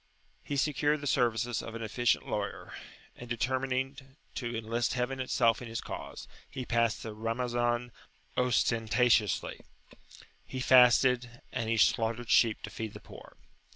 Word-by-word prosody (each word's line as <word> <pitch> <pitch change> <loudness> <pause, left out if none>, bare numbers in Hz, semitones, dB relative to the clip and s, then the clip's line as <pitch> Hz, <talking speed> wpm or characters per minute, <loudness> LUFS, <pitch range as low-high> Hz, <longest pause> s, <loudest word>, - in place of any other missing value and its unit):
He 145 - -3
secured 150 +1 +1
the 145 - -7
services 120 -3 +1
of 115 - -8
an 115 - -5
efficient 110 - 0
lawyer; - - -4 0.4
and, 120 - -11
determining 130 +2 -1 0.3
to 120 -3 -4
enlist 115 +3 -1
heaven 130 +2 -2
itself 120 -3 +2
in 125 - -7
his 115 0 -4
cause, - - -7 0.2
he 130 -2 -6
passed 115 -2 +1
the 110 - -6
Ramazan 120 +2 -1 0.4
ostentatiously; 115 -3 +2 0.8
he 130 - -7
fasted, 125 -1 +4
and 115 -3 -3
he 115 - +1
slaughtered 115 0 +1
sheep 115 -3 +4
to 110 - -6
feed 110 -2 -5
the - - -8
poor. - - -14
120 Hz, 140 wpm, -30 LUFS, 115-125 Hz, 0.8 s, fasted